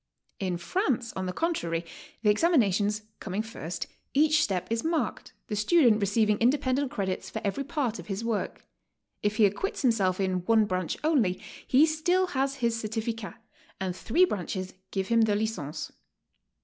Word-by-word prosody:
In 185 Hz, -3 st, -1 dB
France, 245 Hz, -, -1 dB
on 185 Hz, -1 st, -2 dB
the -, -, -1 dB
contrary, 175 Hz, -, -1 dB, 0.4 s
the 210 Hz, -, +6 dB
ex 210 Hz, -, 0 dB
aminations 215 Hz, -, +3 dB, 0.2 s
coming 200 Hz, +2 st, -3 dB
first, 180 Hz, -6 st, -5 dB, 0.3 s
each 305 Hz, +1 st, +5 dB
step 190 Hz, -9 st, 0 dB
is 230 Hz, 0 st, 0 dB
marked, 325 Hz, 0 st, -2 dB
the 210 Hz, -, -3 dB
student 230 Hz, -1 st, +4 dB
receiving 210 Hz, +1 st, +2 dB
independent 260 Hz, +2 st, +2 dB
credits 190 Hz, -4 st, -3 dB
for 220 Hz, -, -4 dB
every 205 Hz, +7 st, -1 dB
part 270 Hz, -5 st, -2 dB
of -, -, -9 dB
his 200 Hz, +2 st, -3 dB
work. 230 Hz, -3 st, -2 dB, 0.6 s
If 210 Hz, 0 st, 0 dB
he 215 Hz, -1 st, +5 dB
acquits 245 Hz, -, -1 dB
himself 200 Hz, -7 st, +2 dB
in 185 Hz, -2 st, 0 dB
one 225 Hz, -2 st, +5 dB
branch 185 Hz, -3 st, -2 dB
only, 255 Hz, -, +2 dB, 0.3 s
he 275 Hz, +4 st, +6 dB
still 335 Hz, +4 st, +2 dB
has 270 Hz, 0 st, 0 dB
his 235 Hz, -3 st, 0 dB
certificat, 225 Hz, 0 st, -3 dB, 0.4 s
and 185 Hz, -2 st, -2 dB
three 325 Hz, -, +3 dB
branches 185 Hz, -, -4 dB, 0.2 s
give 190 Hz, -1 st, -2 dB
him 230 Hz, -1 st, +4 dB
the 215 Hz, -2 st, +3 dB
licence. 205 Hz, -9 st, -3 dB
220 Hz, 160 wpm, -28 LUFS, 190-270 Hz, 0.6 s, the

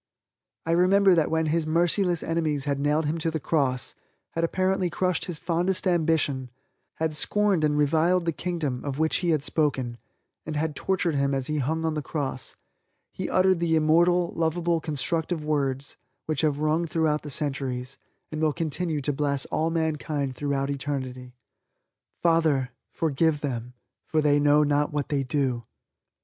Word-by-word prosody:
I 165 Hz, -, 0 dB
remember 190 Hz, +3 st, +5 dB
that 165 Hz, -3 st, +2 dB
when 160 Hz, 0 st, +1 dB
His 155 Hz, +1 st, 0 dB
merciless 175 Hz, +2 st, +2 dB
enemies 155 Hz, -4 st, -1 dB
had 140 Hz, -1 st, -1 dB
nailed 150 Hz, +2 st, +1 dB
Him 155 Hz, +3 st, -1 dB
to 165 Hz, -, 0 dB
the 160 Hz, 0 st, -2 dB
cross, 135 Hz, -4 st, 0 dB, 0.4 s
had 165 Hz, -, -2 dB
apparently 185 Hz, +1 st, +1 dB
crushed 180 Hz, 0 st, -1 dB
His 175 Hz, -3 st, -4 dB
fondest 175 Hz, +4 st, -1 dB
ambition, 160 Hz, -7 st, +1 dB, 0.5 s
had 160 Hz, -1 st, -1 dB
scorned 200 Hz, +1 st, +1 dB
and 150 Hz, -1 st, +2 dB
reviled 165 Hz, +4 st, +2 dB
the 165 Hz, -, +1 dB
Kingdom 155 Hz, -7 st, -3 dB
of 140 Hz, -2 st, -4 dB
which 160 Hz, +1 st, +2 dB
He 175 Hz, -, -1 dB
had 155 Hz, -4 st, +2 dB
spoken, 130 Hz, -7 st, 0 dB, 0.4 s
and 155 Hz, -, -5 dB
had 150 Hz, 0 st, -1 dB
tortured 180 Hz, -3 st, 0 dB
Him 140 Hz, -1 st, +1 dB
as 135 Hz, -1 st, -1 dB
He 150 Hz, +2 st, -1 dB
hung 160 Hz, +4 st, -1 dB
on 160 Hz, -, 0 dB
the 150 Hz, -, -2 dB
cross, 140 Hz, -4 st, -4 dB, 0.6 s
He -, -, -4 dB
uttered 185 Hz, -1 st, +3 dB
the 165 Hz, -1 st, +2 dB
immortal, 170 Hz, +3 st, +3 dB
lovable, 165 Hz, +1 st, 0 dB
constructive 160 Hz, +2 st, -2 dB
words 140 Hz, -2 st, -1 dB, 0.3 s
which 155 Hz, -3 st, -1 dB
have 150 Hz, -3 st, +1 dB
rung 155 Hz, +3 st, +1 dB
throughout 155 Hz, -2 st, +1 dB
the 150 Hz, -, -8 dB
centuries, 135 Hz, -2 st, -3 dB, 0.3 s
and 155 Hz, 0 st, -4 dB
will 155 Hz, -2 st, +2 dB
continue 160 Hz, -1 st, -2 dB
to 145 Hz, +2 st, -1 dB
bless 140 Hz, -1 st, 0 dB
all 160 Hz, +1 st, +1 dB
mankind 150 Hz, -4 st, -1 dB
throughout 140 Hz, 0 st, -1 dB
eternity: 130 Hz, -3 st, -5 dB, 0.9 s
"Father, 160 Hz, -6 st, +2 dB, 0.2 s
forgive 160 Hz, -1 st, 0 dB
them, 125 Hz, -3 st, -4 dB, 0.3 s
for 155 Hz, -, +1 dB
they 145 Hz, -1 st, +3 dB
know 145 Hz, +1 st, +5 dB
not 145 Hz, 0 st, +1 dB
what 145 Hz, -1 st, -2 dB
they 145 Hz, -3 st, +1 dB
do." 130 Hz, -3 st, -1 dB
155 Hz, 165 wpm, -26 LUFS, 140-165 Hz, 0.9 s, remember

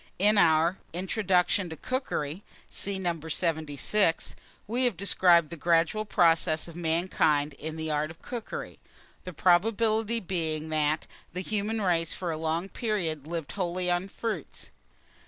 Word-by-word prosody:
In 210 Hz, +3 st, +4 dB
Our 165 Hz, +1 st, +4 dB
"INTRODUCTION 185 Hz, 0 st, +1 dB
TO 160 Hz, -, -6 dB
COOKERY" 185 Hz, -, -3 dB, 0.3 s
(see 200 Hz, -1 st, -2 dB
No. 175 Hz, -3 st, -2 dB
76) 160 Hz, +3 st, 0 dB, 0.3 s
we 245 Hz, +4 st, 0 dB
have 240 Hz, -8 st, 0 dB
described 175 Hz, -4 st, +4 dB
the -, -, -5 dB
gradual 170 Hz, +6 st, +2 dB
progress 165 Hz, -4 st, +3 dB
of 170 Hz, -, -11 dB
mankind 160 Hz, -3 st, +1 dB
in 155 Hz, +3 st, -6 dB
the 160 Hz, -1 st, -3 dB
art 150 Hz, +1 st, 0 dB
of 165 Hz, +1 st, -12 dB
cookery, 235 Hz, -3 st, -6 dB, 0.5 s
the 180 Hz, -, -5 dB
probability 220 Hz, +6 st, +2 dB
being, 160 Hz, -5 st, -2 dB
that 155 Hz, 0 st, +1 dB, 0.3 s
the 180 Hz, -, -3 dB
human 215 Hz, +2 st, -2 dB
race, 165 Hz, -3 st, +1 dB
for 175 Hz, -2 st, -3 dB
a 160 Hz, -, -3 dB
long 160 Hz, +3 st, -1 dB
period, 175 Hz, -, -2 dB
lived 165 Hz, -3 st, -4 dB
wholly 180 Hz, -1 st, -1 dB
on 175 Hz, +2 st, 0 dB
fruits. 200 Hz, -5 st, -5 dB
175 Hz, 140 wpm, -28 LUFS, 160-200 Hz, 0.5 s, In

